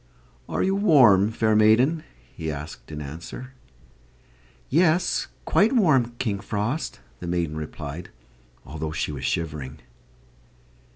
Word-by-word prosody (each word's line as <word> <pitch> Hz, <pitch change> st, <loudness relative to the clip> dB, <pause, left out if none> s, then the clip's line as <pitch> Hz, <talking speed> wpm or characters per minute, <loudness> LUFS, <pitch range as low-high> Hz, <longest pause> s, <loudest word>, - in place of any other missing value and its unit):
"Are -, -, 0 dB
you 190 Hz, -, +2 dB
warm, 130 Hz, -, +5 dB
fair 110 Hz, -1 st, +1 dB
maiden?" 120 Hz, +9 st, +4 dB, 0.3 s
he 80 Hz, -1 st, -5 dB
asked 75 Hz, +2 st, -8 dB
in 75 Hz, -1 st, -5 dB
answer. 85 Hz, -, -8 dB, 1.1 s
"Yes, 175 Hz, +4 st, +2 dB, 0.2 s
quite 215 Hz, +6 st, +3 dB
warm, 135 Hz, -, +3 dB
King 105 Hz, -6 st, -1 dB
Frost," 105 Hz, -, -3 dB, 0.2 s
the 90 Hz, -, -6 dB
maiden 85 Hz, -3 st, -1 dB
replied, 80 Hz, +2 st, -6 dB, 0.6 s
although 80 Hz, +1 st, -5 dB
she 75 Hz, -, -2 dB
was 70 Hz, -2 st, -5 dB
shivering. 75 Hz, -4 st, -3 dB
105 Hz, 115 wpm, -25 LUFS, -, 1.1 s, warm